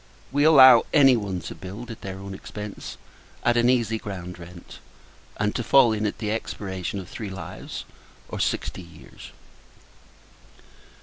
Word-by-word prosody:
We 145 +2 +2
allow 135 -5 +9
any 135 -4 +7
one 100 -5 -3
to - - -7
build 105 +6 -9
at 115 - -10
their 95 -1 -6
own 100 0 -8
expence 105 +1 -8 0.5
at 120 - +3
an 120 0 +3
easy 115 -3 +1
ground 90 -4 -7
rent, 85 0 -12 0.6
and 105 0 0
to 120 - -2
fall 125 -2 +5
in 105 0 -1
at 105 - -4
the 105 -1 -3
expiration 100 -3 -4
of 95 - -8
three 105 +2 -7
lives, 95 -4 -8 0.4
or - - -6
sixty - - -2
years. 80 -5 -14
105 Hz, 150 wpm, -24 LUFS, 95-120 Hz, 0.6 s, allow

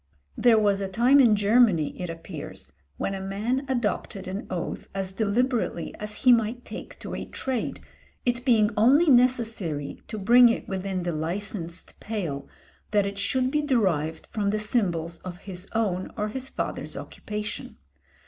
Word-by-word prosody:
There 235 -2 +5
was 205 -2 +2
a 195 - -1
time 240 +8 +4
in 235 -5 +6
Germany 205 -6 +3
it 180 - -3
appears 155 - -8 0.3
when 195 - -2
a 195 - -4
man 220 +8 -2
adopted 240 -6 -2
an 190 +3 -5
oath 175 -2 -4
as 190 -1 -2
deliberately 230 +5 0
as 210 0 -5
he 250 - +9
might 235 +2 0
take - - -8
to - - -6
a - - -3
trade, 260 -4 -3 0.4
it 240 0 0
being 225 -4 +4
only 275 +9 +5
necessary, 225 - +1
to 215 - -5
bring 240 +4 +7
it 230 - -2
within 190 -1 -2
the 175 -1 -1
licensed 170 +2 -4
pale, 175 -11 -4 0.4
that 205 -2 +3
it 200 0 -4
should 255 +5 +1
be 300 - +2
derived 185 - +1
from 205 -2 0
the 210 - +1
symbols 175 -7 -1
of 180 -1 -7
his 185 0 -8
own 195 -5 0
or 210 0 -1
his 265 +4 -5
father's - - -4
occupation. 210 -1 -6
210 Hz, 160 wpm, -26 LUFS, 185-240 Hz, 0.4 s, he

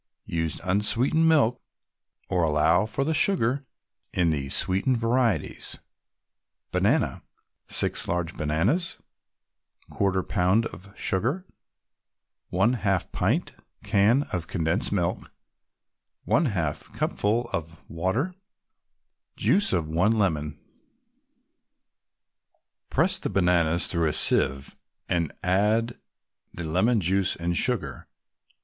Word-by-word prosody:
Use 80 -2 -3
unsweetened 115 - +1
milk, 135 -6 +2 0.7
or 90 - 0
allow 80 +5 +2
for 135 +5 -2
the 160 +3 -1
sugar 140 - +3 0.4
in 85 -3 +1
the 70 -3 -3
sweetened 95 - +1
varieties. 115 - 0 0.9
BANANA - - 0 0.5
6 - - +1
large 85 -1 -2
bananas 95 - -1 0.9
1/4 95 -2 -1
pound 95 +6 +1
of 100 -2 -10
sugar 120 - -1 1.0
1 100 +7 +1
half 95 -4 -1
pint - - -1 0.3
can 110 +8 +2
of 85 -2 -3
condensed 85 +3 -1
milk 90 -3 -2 1.0
1/2 95 - -1
cupful 115 +4 -1
of 80 0 -5
water 95 - -2 1.0
Juice 205 - +2
of 85 -4 0
one 90 +8 +1
lemon 75 -7 -1 2.3
Press - - +2
the - - -4
bananas 85 -3 +2
through 85 -2 0
a 75 - -1
sieve, 70 +1 +5 0.3
and 85 -4 -1
add 105 +6 +1 0.6
the 85 - -5
lemon 105 +8 +1
juice 95 +2 +2
and 85 +1 -2
sugar. 90 - 0
95 Hz, 100 wpm, -25 LUFS, 85-115 Hz, 2.3 s, sieve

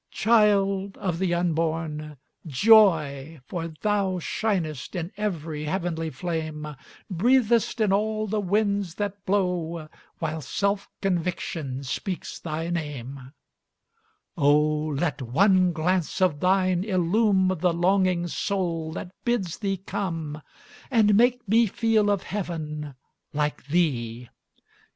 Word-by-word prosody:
Child 200 -3 +2
of 180 -5 -2
the 185 -2 0
Unborn! 160 -3 -1 0.3
joy! 160 - +4
for 165 +3 -4
thou 190 +4 -1
Shinest 180 - -2
in 175 +1 -3
every 165 -7 -3
heavenly 165 -1 -2
flame, 155 0 -4 0.4
Breathest 235 +4 +2
in 210 -3 +3
all 215 +1 0
the 215 +1 -1
winds 200 -2 0
that 205 -1 -4
blow, 175 -5 -1 0.3
While 160 -1 -3
self 200 +8 -1
conviction 170 -7 -2
speaks 180 +7 -4
thy 165 +1 -4
name: 140 -5 -5 1.0
Oh, 150 +2 +3
let 150 -2 -1
one 185 - +3
glance 175 +2 0
of 180 -6 +2
thine 185 0 +2
illume 190 0 +2
The 180 +1 +2
longing 180 0 +2
soul 170 -3 -2
that 180 - -6
bids 225 -9 -1
thee 195 -2 -1
come, 165 -5 -4 0.5
And 220 -5 +4
make 245 +2 +3
me 225 +3 +4
feel 220 0 +2
of 200 -2 +1
heaven, 155 -7 -5 0.4
like 150 -2 -2
thee! 125 -8 -1
180 Hz, 115 wpm, -25 LUFS, 155-200 Hz, 1.0 s, joy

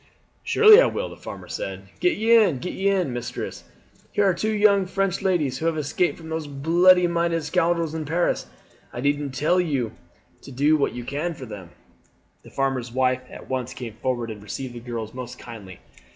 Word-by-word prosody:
"Surely 435 +1 +7
I - - +4
will," - - -3
the - - -10
farmer - - -9
said. - - -6
"Get 360 0 +2
ye 225 +2 +4
in, 200 - +4
get 180 - -5
ye 195 - -1
in. 185 -9 +1
Mistress, 120 -1 -5 0.5
here 205 - +1
are 190 - +4
two 215 +5 -2
young 205 -2 +4
French 195 -1 -1
ladies 150 -9 0
who 165 - -1
have 165 -1 0
escaped 155 +4 0
from 160 -1 -11
those 160 -1 -3
bloody 175 +6 +4
minded 170 -1 0
scoundrels 165 +1 +1
in 160 -1 -3
Paris. 170 +4 0 0.4
I - - -7
needn't 145 -1 -1
tell 165 +7 +2
you 135 -10 -1 0.5
to - - -11
do 145 +4 +3
what 145 - 0
you 120 - -5
can 155 +7 -3
for 130 - -8
them." 100 -6 -9 0.7
The - - -15
farmer's 135 -3 -2
wife 130 0 +1
at - - -11
once 130 -1 -3
came 120 -4 -7
forward 120 0 -2
and 105 -2 -9
received 125 +4 -6
the 120 - -7
girls 115 -2 -6
most 125 -1 -7
kindly. 100 -6 -10
150 Hz, 195 wpm, -24 LUFS, 125-180 Hz, 0.7 s, Surely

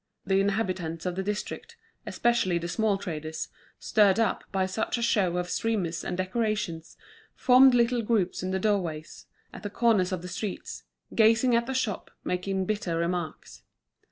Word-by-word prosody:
The 190 +1 +2
inhabitants 185 -5 -1
of 180 - -1
the 190 - -1
district, 210 - -5 0.3
especially 235 -7 +1
the 170 0 -3
small 210 +3 +1
traders, 160 -4 -5 0.3
stirred 205 -2 +3
up 225 -4 +1
by 190 -1 +1
such 205 +6 -2
a - - -3
show 190 -6 +2
of 180 0 -1
streamers 180 -5 -1
and 180 - -3
decorations, 185 -4 -2 0.4
formed 255 0 +6
little 240 0 +3
groups 210 -5 0
in 185 - -3
the 190 - 0
doorways, 180 -6 -2 0.3
at - - -9
the 205 - -4
corners 210 -4 +2
of 180 -2 -3
the - - -6
streets, 185 +2 -5 0.3
gazing 230 +2 +4
at 235 0 +1
the 265 - -3
shop, 230 -6 -2
making 190 +1 -1
bitter 205 -5 -1
remarks. 170 -1 -3
195 Hz, 160 wpm, -27 LUFS, 180-225 Hz, 0.4 s, formed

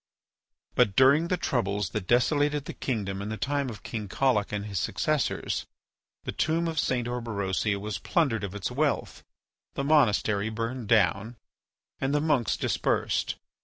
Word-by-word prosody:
But 110 -6 +3
during 140 +5 +5
the 180 - 0
troubles 100 - -1
that 105 -4 -4
desolated 145 +4 +2
the - - -6
kingdom 100 -6 -3
in 100 - -4
the 110 - -4
time 145 0 -1
of 110 - -9
King 110 -3 -5
Collic 115 -1 +1
and 105 -1 -3
his 100 -4 -3
successors, - - -1 0.6
the - - -3
tomb 165 +2 0
of 160 -2 -1
St. 125 -3 0
Orberosia 105 -4 -1
was 105 0 -4
plundered 135 - +1
of 100 0 -5
its 100 - -3
wealth, - - -1 0.5
the 140 - -1
monastery 110 -8 +3
burned 115 +1 -4
down, 105 +1 +2 0.6
and 135 +2 0
the - - +3
monks 145 - +1
dispersed. - - 0
115 Hz, 155 wpm, -27 LUFS, 100-140 Hz, 0.6 s, during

